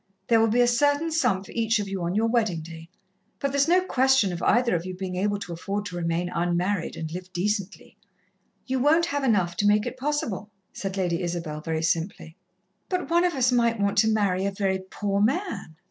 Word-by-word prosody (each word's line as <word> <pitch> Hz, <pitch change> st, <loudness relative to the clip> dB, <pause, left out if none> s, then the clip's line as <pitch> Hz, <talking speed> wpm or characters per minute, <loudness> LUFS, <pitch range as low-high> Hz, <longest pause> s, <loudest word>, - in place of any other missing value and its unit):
There 230 Hz, -1 st, +5 dB
will 225 Hz, -, +4 dB
be 235 Hz, +3 st, +3 dB
a 245 Hz, -, +4 dB
certain 290 Hz, +6 st, +2 dB
sum 245 Hz, -12 st, +1 dB
for -, -, -13 dB
each 225 Hz, 0 st, +1 dB
of 205 Hz, -1 st, -3 dB
you 195 Hz, -1 st, -4 dB
on 170 Hz, +2 st, -2 dB
your 220 Hz, +2 st, +2 dB
wedding 220 Hz, -8 st, +1 dB
day, 165 Hz, +1 st, -10 dB, 0.5 s
but 280 Hz, -, -2 dB
there's 280 Hz, +1 st, +2 dB
no 360 Hz, +2 st, +4 dB
question 260 Hz, -, +3 dB
of 170 Hz, -, -5 dB
either 240 Hz, -2 st, +3 dB
of 165 Hz, -, -2 dB
you 185 Hz, 0 st, -6 dB
being 185 Hz, -1 st, -5 dB
able 205 Hz, +2 st, 0 dB
to 200 Hz, -4 st, -7 dB
afford 200 Hz, +4 st, -4 dB
to 180 Hz, -3 st, -6 dB
remain 170 Hz, 0 st, -1 dB
unmarried, 175 Hz, +2 st, -1 dB
and 160 Hz, -1 st, -5 dB
live 180 Hz, +2 st, -7 dB
decently. 200 Hz, +2 st, -3 dB, 0.7 s
You 260 Hz, 0 st, -1 dB
won't 315 Hz, +6 st, +4 dB
have 285 Hz, -4 st, -2 dB
enough 185 Hz, -9 st, +2 dB
to 205 Hz, -, +2 dB
make 210 Hz, 0 st, +3 dB
it -, -, -5 dB
possible," 255 Hz, -8 st, -2 dB, 0.2 s
said 195 Hz, -1 st, -5 dB
Lady 175 Hz, -2 st, 0 dB
Isabel 170 Hz, -3 st, -4 dB
very 160 Hz, 0 st, -2 dB
simply. 165 Hz, -1 st, -2 dB, 0.5 s
"But 360 Hz, -5 st, -2 dB
one 345 Hz, +1 st, +4 dB
of 350 Hz, -3 st, 0 dB
us 250 Hz, -1 st, +2 dB
might 235 Hz, -2 st, +2 dB
want 200 Hz, 0 st, +1 dB
to 220 Hz, -, +4 dB
marry 195 Hz, -4 st, +1 dB
a -, -, -1 dB
very 195 Hz, -1 st, -1 dB
poor 200 Hz, -1 st, -1 dB
man." 265 Hz, -, -1 dB
205 Hz, 215 wpm, -25 LUFS, 175-245 Hz, 0.7 s, There